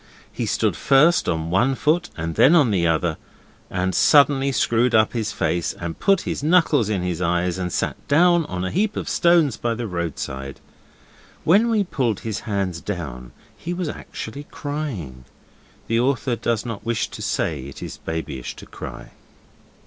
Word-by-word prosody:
He - - -3
stood - - +1
first 150 +5 +4
on 80 0 -2
one 120 +9 +2
foot 165 +6 +1
and 80 0 -3
then 145 - +5
on 145 -9 +4
the 85 -4 +2
other, 80 0 0 0.5
and 90 0 -1
suddenly 140 - +4
screwed 120 -1 +2
up 110 0 +4
his 115 -2 -2
face 85 -1 -1
and 85 -2 -6
put 195 -2 +3
his - - -4
knuckles 155 - +3
in 100 -4 -1
his 90 -1 -2
eyes 90 +1 0
and 90 -1 -2
sat - - -3
down 170 +2 +4
on 90 0 -3
a - - -3
heap 210 +4 0
of - - -3
stones 170 -9 +3
by 115 -1 -1
the 120 +1 -4
roadside. 70 -7 -4 0.8
When 205 +8 +4
we 220 -3 +2
pulled 125 - -1
his 110 -3 -3
hands 100 -6 -3
down 65 -11 -6 0.2
he 175 +1 -5
was 175 -3 -2
actually 145 0 -7
crying. 115 - -5 0.6
The 115 0 +1
author 125 -1 +1
does 115 0 -1
not 115 -4 -5
wish 115 -1 -1
to - - -9
say 70 -5 -2
it 70 - -9
is - - -7
babyish 75 -6 -5
to - - -11
cry. - - -9
110 Hz, 170 wpm, -22 LUFS, 85-145 Hz, 0.8 s, then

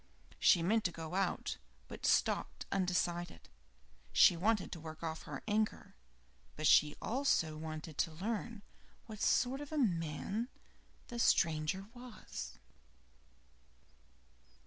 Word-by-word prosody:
She 170 - +5
meant 215 +5 +2
to 175 - +2
go 165 0 -7
out, 190 -1 -1 0.3
but - - -4
stopped - - +1
undecided 175 - -1 0.6
she 175 - +7
wanted 205 +3 +1
to 170 - -6
work 160 +1 -9
off 160 -1 -3
her - - -6
anger, 215 0 -1 0.6
but 155 - -3
she 150 0 +6
also 225 - +1
wanted 155 0 -7
to 165 - +1
learn 210 +5 -4 0.4
what 215 -2 -9
sort 260 +4 +2
of 290 - -8
a 310 - -2
man 195 - -1 0.6
the 240 - -5
stranger 165 -1 +2
was. 245 -3 -8
180 Hz, 120 wpm, -35 LUFS, 160-225 Hz, 0.6 s, she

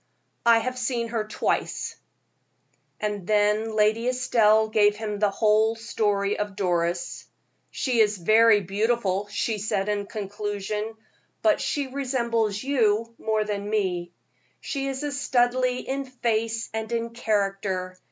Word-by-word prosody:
"I 230 -1 +7
have 255 +2 -2
seen 240 -2 -1
her 225 -2 -2
twice." - - -2 1.0
And 205 -3 -3
then 215 +1 +2
Lady 215 +2 +2
Estelle 225 -4 +3
gave 210 -1 +3
him 210 -1 -4
the 210 -1 +3
whole 215 +2 +3
history 210 -3 -1
of 210 -1 -3
Doris. 175 -3 -1 0.4
"She 250 -4 -1
is 210 -1 +4
very 215 +4 +5
beautiful," 205 0 0
she 210 +1 -2
said, 200 -1 -1
in 205 -1 -1
conclusion, 210 +1 -4 0.5
"but 320 -2 +3
she 285 -2 -1
resembles 235 -6 -1
you 230 -4 +1
more 220 -1 0
than 205 -1 -4
me. 180 -5 -1 0.5
She 275 -1 -3
is 270 +1 -3
a 290 - -2
Studleigh 250 -2 +1
in 275 +1 -2
face 230 -3 -2
and 220 0 -4
in 230 0 -2
character. 195 -5 -1
215 Hz, 135 wpm, -25 LUFS, 205-235 Hz, 1.0 s, I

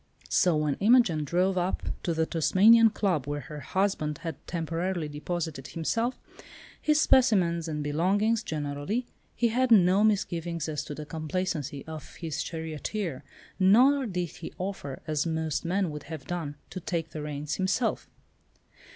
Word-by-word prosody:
So 180 -3 +3
when 150 -2 0
Imogen 205 -8 +4
drove 180 +5 +1
up 180 +2 -1 0.2
to 170 - -1
the 160 0 +2
Tasmanian 215 +8 +5
Club, 185 - -1
where 145 0 -2
her 150 +2 -8
husband 155 -1 -1
had 165 -3 -3
temporarily 170 0 -2
deposited 150 -2 -4
himself, 225 - -1 0.6
his 305 0 +3
specimens 185 - +3
and 150 -2 -3
belongings 195 +9 +1
generally, 150 - -3 0.3
he 235 - +2
had 255 +3 +1
no 195 -2 +6
misgivings 170 -6 0
as 150 -2 -3
to 145 - -6
the 150 - -7
competency 155 -2 -3
of 155 -2 -9
his 160 -5 -4
charioteer, 160 0 -4 0.4
nor 250 +8 +5
did 180 -4 -2
he 165 - -7
offer, 180 -8 -5
as 155 0 0
most 160 -1 -2
men 185 0 0
would 150 -1 -7
have 155 -5 -7
done, 165 -4 -4 0.2
to 185 - -5
take 165 -2 -3
the 155 - -5
reins 150 0 -4
himself. 200 +5 0
170 Hz, 150 wpm, -28 LUFS, 150-195 Hz, 0.6 s, no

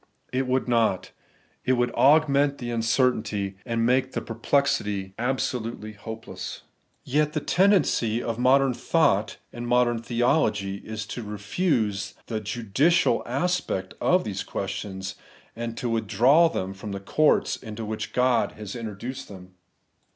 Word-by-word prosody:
It 130 0 0
would 130 0 0
not. 115 -6 +1 0.5
It 130 - +2
would 120 -1 +1
augment 140 0 +4
the 120 -2 -5
uncertainty, 110 -4 0
and 115 -1 0
make 130 +2 +2
the 115 - -2
perplexity 115 -5 0
absolutely 120 -3 -2
hopeless. 110 +2 -8 0.4
Yet 150 +3 +1
the - - 0
tendency 180 - +2
of 115 -1 -3
modern 135 +1 +4
thought - - +1 0.2
and 120 0 -5
modern 120 -1 +2
theology 115 -5 +1
is 110 +1 -6
to 110 +3 -6
refuse 105 - -1
the 110 -2 -3
judicial 120 - +2
settlement 140 - -1
of 180 +1 +3
these 95 -3 -4
questions, 95 0 -4 0.4
and 115 0 -5
to 125 - -2
withdraw 120 +8 +4
them 95 - -3
from 100 +1 -7
the 100 - -4
courts 150 +10 +2
into 110 -1 -7
which 105 0 -4
God 125 -1 +2
has 105 -1 -8
introduced 120 +4 -6
them. 95 -2 -12
115 Hz, 135 wpm, -25 LUFS, 105-130 Hz, 0.5 s, augment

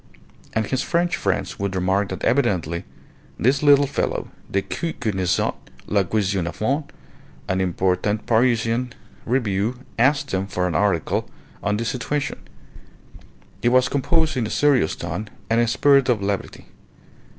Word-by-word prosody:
And 110 0 +1
his 130 +5 -1
French 175 +1 +1
friends - - -2
would 100 -1 -2
remark 95 +2 +1
that 95 0 -6
evidently 90 - +1 0.5
this 135 +4 +2
little 145 -1 +6
fellow 140 - -2 0.2
Decoud 130 - -2
connaissait 95 -6 0 0.3
la 100 -1 +2
question 95 -2 0
a - - -2
fond. 140 +7 -2 0.6
An 95 0 0
important 95 +3 0
Parisian 115 +1 +2 0.3
review 115 -1 0 0.2
asked 140 +1 +2
him 95 +1 0
for 90 -2 -1
an 90 - -1
article 85 -1 +1 0.3
on 105 0 0
the 115 - -2
situation. 145 +5 -2 1.2
It 120 - +3
was 125 0 +4
composed 155 +3 +1
in 120 -4 0
a - - -7
serious 140 - +2
tone 105 0 -5 0.2
and 115 - +4
in 120 - +4
a - - -4
spirit 135 +2 +4
of 120 -4 +3
levity. 100 0 -3
110 Hz, 145 wpm, -22 LUFS, 95-135 Hz, 1.2 s, little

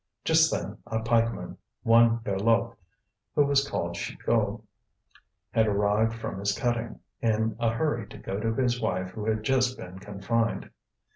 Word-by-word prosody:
Just 160 0 +5
then - - -3
a 110 -1 -1
pikeman, 115 0 0 0.3
one 115 0 +5
Berloque, 115 +4 +1 0.6
who 145 - +5
was 140 0 +2
called 85 -9 -2
Chicot, 110 +4 -1 0.9
had 110 -1 +3
arrived 105 +2 +2
from 115 -4 -5
his 100 +1 0
cutting, 120 -1 -1 0.2
in 110 -1 +1
a 115 -1 +2
hurry 145 +7 -1
to - - -11
go 95 - -4
to 115 +1 0
his 125 -1 +1
wife 95 -4 -1
who 105 +1 -6
had 110 -1 0
just 130 +1 +2
been 90 +1 -9
confined. 105 +4 -2
115 Hz, 150 wpm, -27 LUFS, 105-120 Hz, 0.9 s, Just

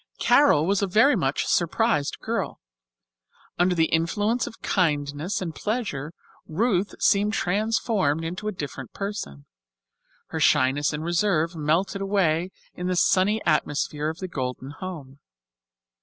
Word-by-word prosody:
Carol 220 - +4
was 200 +2 +1
a 200 - +1
very 220 +9 +4
much 140 -8 0
surprised 175 -2 +1
girl. - - -3 1.0
Under 180 +1 +3
the 165 -1 +3
influence 205 +9 +1
of 230 - -10
kindness 150 +1 0
and 165 -3 -5
pleasure 200 - -3 0.4
Ruth 200 +2 0
seemed 205 +1 +3
transformed 200 - 0
into 180 +6 -5
a - - 0
different 140 - -7
person. 195 - -5 0.8
Her - - -4
shyness 135 +3 +3
and 150 0 -4
reserve 170 -1 +1
melted 165 +6 0
away 185 -4 +1 0.2
in 180 - -5
the 185 - 0
sunny 195 +4 +2
atmosphere 150 -1 0
of 160 - -6
the 185 - -5
Golden 130 -3 -5
home. 145 -5 -8
175 Hz, 130 wpm, -25 LUFS, 150-205 Hz, 1.0 s, Carol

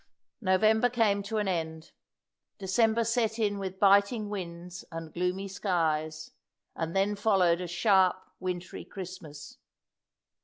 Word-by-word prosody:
'" - - -56
November 220 +5 +4
came 220 -4 +2
to 215 +2 -4
an 210 -2 0
end. 160 -3 -3 0.7
December 220 +4 +2
set 230 -1 0
in 205 -3 0
with 190 -1 -5
biting 200 +2 +4
winds 175 -3 -6
and 165 -1 -7
gloomy 180 +3 -1
skies, 160 -5 -1 0.4
and 165 +1 -3
then 195 +2 +2
followed 190 -5 +3
a 180 - -4
sharp, 185 +1 +3 0.2
wintry 180 -1 -5
Christmas. 170 -6 -9
190 Hz, 125 wpm, -29 LUFS, 170-210 Hz, 0.7 s, November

